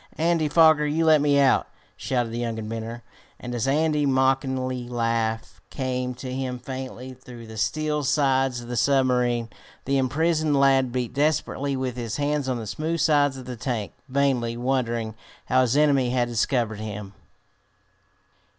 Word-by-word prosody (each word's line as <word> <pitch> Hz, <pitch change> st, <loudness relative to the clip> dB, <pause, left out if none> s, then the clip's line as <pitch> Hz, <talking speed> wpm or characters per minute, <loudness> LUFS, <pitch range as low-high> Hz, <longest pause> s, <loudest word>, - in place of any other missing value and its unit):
Andy 165 Hz, -1 st, +1 dB
Foger, 155 Hz, -1 st, +5 dB
you 160 Hz, +2 st, +1 dB
let 155 Hz, -2 st, +5 dB
me 145 Hz, -1 st, +3 dB
out!" 135 Hz, -2 st, +3 dB, 0.3 s
shouted 120 Hz, -3 st, -2 dB
the 115 Hz, -, -4 dB
young 115 Hz, -2 st, -2 dB
inventor; 115 Hz, +1 st, -5 dB, 0.4 s
and 125 Hz, 0 st, -6 dB
as 120 Hz, +1 st, -1 dB
Andy's 150 Hz, +1 st, +2 dB
mocking 130 Hz, 0 st, +2 dB, 0.3 s
laugh 115 Hz, -2 st, -2 dB
came 125 Hz, -2 st, -3 dB
to 130 Hz, +1 st, -6 dB
him 130 Hz, -1 st, -3 dB
faintly 130 Hz, 0 st, -7 dB
through 125 Hz, -2 st, -12 dB
the 110 Hz, 0 st, -10 dB
steel 150 Hz, +7 st, -1 dB
sides 135 Hz, -3 st, +1 dB
of 120 Hz, -, -10 dB
the 120 Hz, -, -4 dB
submarine, 125 Hz, -1 st, +2 dB, 0.4 s
the 135 Hz, 0 st, +1 dB
imprisoned 155 Hz, +2 st, +1 dB
lad 135 Hz, -2 st, +4 dB
beat 125 Hz, -1 st, -3 dB
desperately 140 Hz, -1 st, 0 dB
with 130 Hz, -2 st, -3 dB
his 115 Hz, -1 st, -4 dB
hands 145 Hz, -1 st, -1 dB
on 125 Hz, -, -1 dB
the 115 Hz, -, -6 dB
smooth 160 Hz, +9 st, -3 dB
sides 145 Hz, -4 st, +3 dB
of 130 Hz, -, -9 dB
the 125 Hz, 0 st, -6 dB
tank, 115 Hz, -3 st, -3 dB, 0.2 s
vainly 130 Hz, -4 st, +1 dB
wondering 120 Hz, -3 st, -1 dB, 0.3 s
how 130 Hz, 0 st, +3 dB
his 125 Hz, +2 st, +2 dB
enemy 140 Hz, -4 st, +3 dB
had 120 Hz, -1 st, +1 dB
discovered 115 Hz, -2 st, 0 dB
him. 105 Hz, -2 st, -6 dB
130 Hz, 160 wpm, -24 LUFS, 120-140 Hz, 0.4 s, Foger